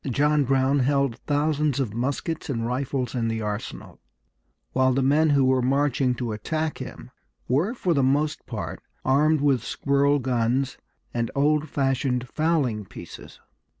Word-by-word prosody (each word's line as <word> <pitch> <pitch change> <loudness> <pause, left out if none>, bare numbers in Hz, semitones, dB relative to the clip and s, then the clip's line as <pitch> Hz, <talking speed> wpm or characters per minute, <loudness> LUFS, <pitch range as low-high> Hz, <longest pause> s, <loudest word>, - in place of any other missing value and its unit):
John 145 +3 +2
Brown 135 +2 +2
held 140 -2 +1
thousands 150 -1 +1
of 120 -6 -1
muskets 140 +7 -3
and 115 -4 -1
rifles 125 0 -2
in 120 -3 -1
the 115 -1 -2
arsenal, 105 +1 -6 0.7
while 130 0 +3
the 135 +1 +1
men 150 +4 +3
who 140 -2 +4
were 130 0 +3
marching 135 -1 +1
to 120 -1 -3
attack 155 +9 -3
him - - -8 0.4
were 165 - +1
for 180 -7 0
the 140 - +2
most 145 +3 0
part - - -5 0.2
armed 150 +3 +3
with 135 -5 +2
squirrel 140 +2 +2
guns 130 0 0 0.3
and 115 -1 -1
old 150 +2 +2
fashioned 135 -2 0
fowling 145 -9 0
pieces. 95 - -11
135 Hz, 150 wpm, -25 LUFS, 125-145 Hz, 0.7 s, who